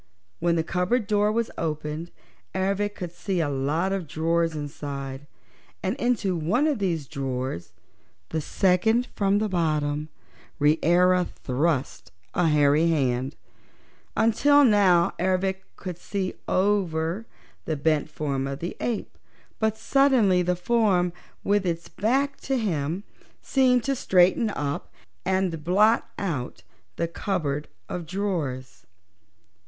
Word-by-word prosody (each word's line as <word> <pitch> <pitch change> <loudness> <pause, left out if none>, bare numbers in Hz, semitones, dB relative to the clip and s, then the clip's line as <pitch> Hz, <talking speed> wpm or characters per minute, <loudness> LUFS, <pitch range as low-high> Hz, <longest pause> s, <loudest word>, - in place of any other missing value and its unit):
When 170 0 +2
the 165 - +1
cupboard 180 +8 0
door 210 0 +2
was 230 +1 -1
opened 155 +1 -3 0.5
Ervic 200 +2 0
could 175 -2 -5
see 185 +1 -2
a 160 -3 +1
lot 150 +7 0
of 190 -5 -3
drawers 165 +2 0
inside, 140 -2 -6 0.6
and 190 +5 0
into 240 -8 0
one 175 - +1
of 295 -7 +1
these 170 -7 -1
drawers 130 -11 -4 0.6
the 160 - -1
second 210 +9 +2
from 200 0 +2
the 215 +1 +1
bottom 155 -4 0 0.5
Reera 175 +5 +4
thrust 130 - -1 0.2
a 175 -2 +2
hairy 150 +1 +4
hand. 135 -4 0 0.8
Until 280 +6 +5
now 195 -6 +4
Ervic 190 +1 0
could 180 -3 -7
see 190 -1 -3
over 185 0 0 0.4
the 155 - -1
bent 155 +1 +1
form 140 -3 -2
of 135 0 -4
the 170 +5 -5
ape, 235 -3 -3 0.4
but 220 0 +1
suddenly 250 -11 +3
the 180 0 +1
form, 180 -3 +2 0.3
with 205 0 +2
its 170 -2 -2
back 270 +7 0
to 270 0 -1
him, 175 - -1 0.4
seemed 255 -3 +3
to 275 +3 0
straighten 190 +1 +3
up 145 -7 -3 0.4
and 185 -4 0
blot 210 +7 +3
out 130 - -3 0.3
the 170 - -1
cupboard 160 -5 -2 0.2
of 175 -3 -5
drawers. 150 - -3
175 Hz, 125 wpm, -25 LUFS, 150-205 Hz, 0.8 s, Until